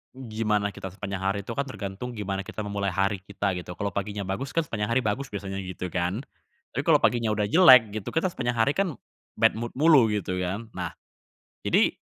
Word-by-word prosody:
gimana 110 -4 -1
kita 95 - -7
sepanjang 100 0 -5
hari 95 +1 0
itu 110 - -6
kan 140 +4 -2
tergantung 120 0 -6
gimana 100 -2 -3
kita 110 +2 -5
memulai 100 -1 -2
hari 95 +2 0
kita 100 +1 -2
gitu. 90 0 -6
Kalo 100 +2 -2
paginya 100 +2 -3
bagus 100 +8 -3
kan 165 - +3
sepanjang 105 -7 -3
hari 130 - +3
bagus 125 +6 -1
biasanya 100 -2 -5
gitu 90 -1 -5
kan. 90 +7 -1 0.5
Tapi - - -2
kalo - - +7
paginya 115 -3 +3
udah 105 -1 0
jelek 130 - +8
gitu, 110 - -4
kita 165 +3 +2
sepanjang 120 -6 -2
hari 115 +5 +4
kan 190 -6 0 0.4
bad 115 +1 +5
mood 120 0 -4
mulu 145 -4 +6
gitu 90 -3 -2
kan. 100 +5 -3
Nah, - - -3 0.7
jadi - - +3
105 Hz, 200 wpm, -26 LUFS, 95-120 Hz, 0.7 s, jelek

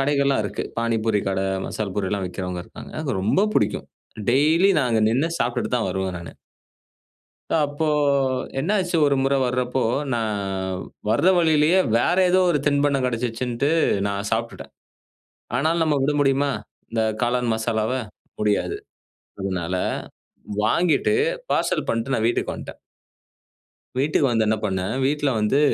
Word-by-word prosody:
கடைகள்லாம் 140 -3 +2
இருக்கு. 100 - -3 0.2
பாணிபூரி 115 -2 +1
கடை, 95 0 -1 0.2
மசால் 105 -3 -4
பூரிலாம் 100 -1 -1
விக்கிறவங்க 90 -1 -4
இருக்காங்க.அது 155 -3 -6
ரொம்ப 110 - +2
புடிக்கும். 105 0 0 0.4
டெய்லி 155 +9 +4
நா - - +2
அங்க 115 -1 +2
நின்னு 135 +9 +1
சாப்பிட்டுட்டு 120 +1 -1
தான் 115 - -1
வருவேன் 95 -1 -2
நானு. 85 - -9 1.2
அப்போ 150 0 0 0.7
என்னாச்சு 180 +3 0
ஒருமுறை 140 -1 +2
வரப்போ, 125 +1 -1 0.3
நா 120 - +1 0.9
வர 110 +9 +2
வழியிலேயே 160 +1 +4 0.2
வேற 120 +9 +2
ஏதோ 185 +1 +4
ஒரு 150 - +2
தின்பண்டம் 140 -2 +2
கெடைச்சிருச்சுன்னுட்டு 125 +1 -1 0.4
நா 100 - -1 0.2
சாப்பிட்டுட்டேன். 115 +1 -3 0.8
ஆனாலும் 160 +5 +1
நம்ம 150 -2 +1
விட 145 +2 +1
முடியுமா, 140 0 +2 0.4
இந்த 115 -1 0 0.2
காளான் 120 -1 +1
மசாலாவ? 110 0 -1 0.5
முடியாது. 105 -1 0 0.6
அதனால 95 -2 -2 0.9
வாங்கிட்டு 165 - +2 0.4
பார்சல் - - 0
பண்ட்டு 115 +4 -1
நா - - +1
வீட்டுக்கு 120 - 0
வன்ட்டேன். - - -9 1.2
வீட்டுக்கு 145 +1 +2
வந்து 115 -2 +2
என்ன 110 - +2
பண்னேன், 95 +3 -2
வீட்ல 145 0 +1
வந்து 105 +7 +2
125 Hz, 125 wpm, -23 LUFS, 110-145 Hz, 1.2 s, டெய்லி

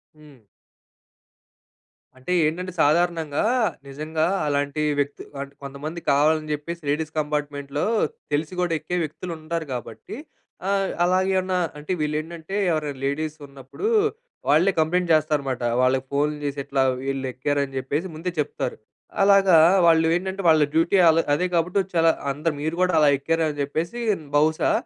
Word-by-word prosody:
హ్మ్. 150 -2 -17 1.8
అంటే 130 +7 -7
ఏంటంటే 180 +4 -2
సాధారణంగా, 160 -1 +1 0.4
నిజంగా 155 +3 -2 0.2
అలాంటి 145 +1 -1 0.2
వ్యక్తి 145 0 -2 0.2
అంటే 140 0 -8
కొంతమంది 145 +5 -6
కావాలని 155 +2 +2
చెప్పేసి 170 +3 -5
లేడీస్ 155 +2 -1
కంపార్ట్మెంట్‌లో, 145 -1 -2 0.5
తెలిసి 150 +4 -1
కూడా 175 -2 0
ఎక్కే 165 +4 -3
వ్యక్తులు 155 +4 -6
ఉంటారు. 160 +1 -4
కాబట్టి 115 - -7 0.5
ఆహ్, 195 -1 +1
అలాగే 185 +2 +2
ఏమన్నా 185 0 -1 0.2
అంటే 150 +4 -6
వీళ్ళు 150 0 -1
ఏంటంటే 165 +3 -7 0.2
ఎవరైనా 150 -4 -2
లేడీస్ 150 +2 -2
ఉన్నప్పుడు 140 - -6 0.6
వాళ్ళే 160 +7 +4
కంప్లెయింట్ 170 +2 +1
చేస్తారనమాట. 145 -5 0 0.2
వాళ్ళకి 130 +1 +2
ఫోన్‌లు 150 +1 0
చేసి, 140 0 -3
ఇట్లా 135 -1 +1 0.2
వీళ్ళు 135 0 -3
ఎక్కారని 140 +1 -1
చెప్పేసి 145 +7 -2
ముందే 170 +3 -3
చెప్తారు. 145 -4 -2 0.5
అలాగా 195 -3 +6 0.3
వాళ్ళు 165 -1 +5
ఏంటంటే, 190 +2 -3
వాళ్ళ 155 -1 +5
డ్యూటీ 165 +4 +3
వాళ్ళ 165 0 +5 0.2
అదే 180 +4 0
కాబట్టి, 180 +3 +1
చాలా 165 0 +5 0.2
అందరు, 150 +3 -2
మీరు 160 +2 -2
కూడా 180 -2 +2
అలా 150 -1 +5
ఎక్కారు 165 +3 0
అని 145 -1 -6
చెప్పేసి, 165 +10 -3 0.4
బహుశా 155 +2 +2
155 Hz, 140 wpm, -23 LUFS, 145-170 Hz, 1.8 s, అలాగా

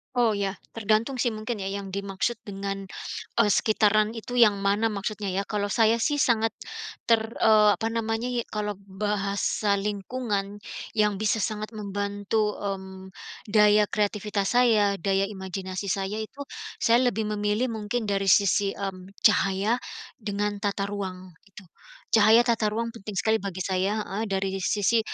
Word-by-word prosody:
Oh 235 -3 +3
ya, 195 -1 -2 0.2
tergantung 225 +4 +1
sih 245 -1 +1
mungkin 220 +2 -4
ya 195 - -3
yang 200 0 -4
dimaksud 200 +4 -2
dengan, 195 -1 -4 0.6
eee, 230 - +5
sekitaran 215 +1 +3
itu 235 +2 -7
yang 215 -5 +5
mana 205 +3 +1
maksudnya 200 0 -3
ya 195 +2 -2
kalau 205 -1 -2
saya 225 +1 +4
sih 295 -1 +1
sangat 225 -4 +2 0.6
ter 225 -1 +3
eee, 215 -1 +6
apa 225 - 0
namanya 225 +1 -1
ya, 245 -1 -1
kalau 210 -1 -2
bahasa 200 +1 -1
lingkungan 205 0 -3 0.3
yang 210 -2 +2
bisa 215 +2 0
sangat 215 +1 -3
membantu, 205 0 -2
mmm, 190 -1 -5 0.4
daya 210 0 +5
kreativitas 205 -1 -1
saya, 220 -5 +3
daya 195 +3 +1
imajinasi 190 0 -5
saya 195 +2 -1
itu 240 +6 -6 0.3
saya 240 +2 +3
lebih 225 -2 0
memilih 210 +4 0
mungkin 220 +2 -2
dari 200 -2 -1
sisi, 200 0 +4
mmm, 195 -1 -6
cahaya 205 +2 +3 0.4
dengan 205 -1 -2
tata 200 -1 -1
ruang, 185 -2 -5 0.2
itu. 195 0 -13 0.5
Cahaya 225 +2 +6
tata 230 -3 +1
ruang, 230 +2 -2
penting 210 -3 -8
sekali 220 +4 +2
bagi 185 -1 -4
saya 195 +3 0
heeh, 205 +3 -4
dari 195 -1 -1
sisi 205 +4 +2
210 Hz, 150 wpm, -26 LUFS, 195-220 Hz, 0.6 s, eee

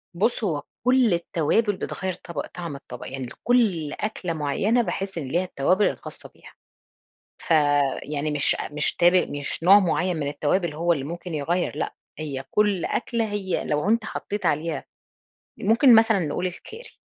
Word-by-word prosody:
بُصّ، 225 +6 0
هو 155 -8 -1 0.2
كل 250 -5 +4
التوابل 175 +5 +1
بتغيّر 190 0 -4
طبق 170 0 -6
طعم 170 -5 -7
الطبق، 125 -3 -9
يعني 135 -1 -5
لكل 190 - +1
أكلة 195 -5 -3
معيّنة 165 +10 +1
باحِس 195 -2 -4
إن 150 -5 -4
ليها 170 +7 0
التوابل 185 +3 +1
الخاصة - - -9
بيها، - - -16 0.9
فيعني 145 -1 +1
مش 145 -1 +2
أ - - -5
مش 150 0 +1
تاب 175 +1 +5 0.2
مش 145 +2 -4
نوع 195 +4 +8
مُعيّن 180 -1 0
من 145 -2 -2
التوابل 150 +4 0
هو 170 +3 +2
اللي 140 - -4
ممكن 170 +3 -6
يغيّر، 165 +3 -1
لأ، - - -2 0.3
هي 140 -4 -4
كل 205 -4 +2
أكلة 235 -1 -1
هي 195 -3 -2
لو 150 +7 0
أنت 225 0 +2
حطيت 205 -1 -5
عليها، 155 +2 0 0.8
ممكن 230 +5 +5
مثلًا 225 -1 +5
نقول 175 +1 -2
الكاري، 440 - -9
175 Hz, 160 wpm, -24 LUFS, 150-205 Hz, 0.9 s, نوع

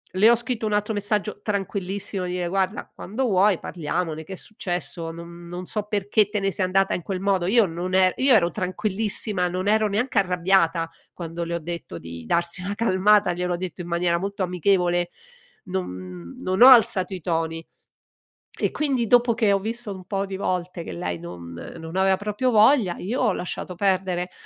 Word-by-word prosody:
le 210 +4 +6
ho 235 - +6
scritto 235 -2 -2
un 210 - -1
altro 210 +1 0
messaggio 210 0 -1
tranquillissimo, 195 -1 -3
dire: 180 0 -2
"Guarda, 190 +3 -1
quando 220 +8 -3
vuoi, 200 -3 +3
parliamone, 160 -1 -3
che 190 - -9
è - - -5
successo, 175 -4 -4
non 170 +1 -10
non 175 +1 -6
so 210 +3 -3
perché 205 0 +1
te 210 0 -1
ne 195 0 0
sei 190 -1 0
andata 195 +1 +2
in - - -2
quel 190 -2 -3
modo." 195 -3 +1
Io 225 +2 +5
non 180 +1 -3
er 185 -1 +4
io 265 0 +4
ero 175 -4 +3
tranquillissima, 195 0 -1
non 185 +2 -3
ero 215 0 +3
neanche 220 +2 +1
arrabbiata 180 -3 +2 0.3
quando 170 0 -5
le 170 +1 -3
ho - - -2
detto 170 - -6
di 85 0 -8
darsi 170 - 0
una 200 +2 -3
calmata, 205 -2 +3
gliel'ho 180 0 -2
detto 180 -1 -6
in 175 - -7
maniera 170 0 +1
molto 200 +1 -3
amichevole, 180 -1 +1 0.6
non 90 - -6
non 185 +3 -1
ho 250 - +11
alzato 205 -7 +6
i 180 - -8
toni. 165 0 -2 0.9
E - - +1
quindi 270 -6 0
dopo 245 -1 +4
che 220 -3 +2
ho 195 - +3
visto 225 +1 -3
un 190 -1 -9
po' 195 0 -1
di 195 0 -5
volte 180 -2 -3
che - - -7
lei 85 0 -3
non 85 0 -9 0.3
non 165 +2 -7
aveva 190 0 +3
proprio 210 +5 -1
voglia, 215 -3 +5
io 225 +8 -3
ho 220 -5 +3
lasciato 180 0 -5
perdere. 185 -2 0
185 Hz, 190 wpm, -24 LUFS, 175-205 Hz, 0.9 s, ho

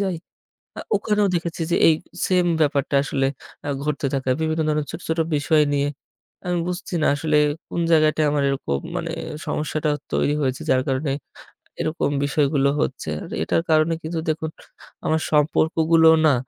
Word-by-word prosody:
যাই, 190 -3 -1 0.6
আ - - -3 0.2
ওখানেও 210 0 +1
দেখেছি 170 -1 -2
যে, - - +3
এ - - +8 0.4
সেইম 180 -1 +2 0.2
ব্যাপারটা 145 -2 0
আসলে 135 -1 0 0.4
আ - - -2 0.2
ঘটতে 150 -1 -1
থাকে। 130 -1 -1
বিভিন্ন 160 0 0
ধরনের 150 -1 0
ছোট, - - -7
ছোট 160 +1 -1 0.2
বিষয় 150 +2 +3
নিয়ে। 140 0 +1 0.6
আমি 180 0 0
বুঝছি 180 0 -5
না - - +3
আসলে 150 +1 0 0.3
কোনো 170 - -1
জায়গাটায় 155 -1 +4
আমার 145 -1 +1
এরকম 130 - -1 0.2
মানে - - -3 0.4
সমস্যাটা 155 +1 -1 0.2
তৈরি 145 - +2
হয়েছে। 130 -1 -1
যার 130 0 +3
কারণে 135 +1 0 0.7
এরকম 155 -2 -1
বিষয়গুলো 140 -1 +2
হচ্ছে। 130 - -3
আর - - -10
এটার 165 - +1
কারণে 155 +1 +4
কিন্তু 160 +1 -3
দেখুন 160 0 -1 0.6
আমার 160 0 +1
সম্পর্কগুলোও 160 +2 +4
না 150 - +5
155 Hz, 155 wpm, -22 LUFS, 145-165 Hz, 0.7 s, এ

